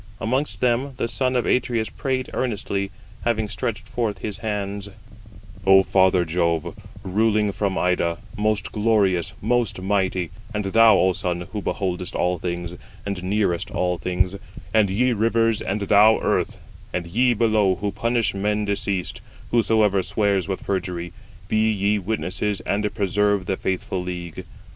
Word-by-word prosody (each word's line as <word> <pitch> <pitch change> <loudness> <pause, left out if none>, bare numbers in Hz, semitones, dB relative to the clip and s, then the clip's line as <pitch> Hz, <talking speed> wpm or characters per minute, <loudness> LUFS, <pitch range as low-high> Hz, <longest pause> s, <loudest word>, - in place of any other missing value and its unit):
Amongst 130 +6 -1
them 125 +2 +1
the 115 - -1
son 130 +2 -1
of 125 - +1
Atreus 120 -4 +1
prayed 130 -2 -2
earnestly, 100 -5 -2 0.3
having 110 -2 0
stretched 105 +2 -4
forth 115 -4 -2
his 105 -2 -5
hands: 100 -2 -3 0.7
"O 95 0 +7
father 95 -2 +3
Jove, 85 0 0 0.3
ruling 105 +2 +2
from 100 -1 -1
Ida, 85 -2 +1 0.2
most 105 -1 0
glorious, 105 -4 +2
most 120 -5 +1
mighty,—and 95 +2 -2
thou, 115 +3 +6
O 95 0 +3
sun, 90 -1 -2
who 105 - -3
beholdest 90 -2 -3
all 90 0 0
things, 85 0 -4 0.3
and 100 -2 -3
nearest 100 -1 0
all 90 -4 -1
things—and 95 +3 -1
ye 125 +6 +2
rivers, 115 0 +2
and 100 +2 -2
thou 105 +2 +6
earth, - - 0 0.3
and 90 -1 -2
ye 120 +8 +2
below 110 -4 +3
who 100 +1 -2
punish 115 -2 0
men 105 +2 0
deceased, 100 -2 -2 0.3
whosoever 110 -4 +3
swears 100 -1 0
with 95 -1 -3
perjury, 90 -3 -3 0.3
be 110 +1 +2
ye 105 0 +1
witnesses 100 0 -2
and 105 +1 -1
preserve 100 -1 +1
the 95 - 0
faithful 95 0 -2
league. 90 -2 -6
100 Hz, 140 wpm, -23 LUFS, 95-110 Hz, 0.7 s, O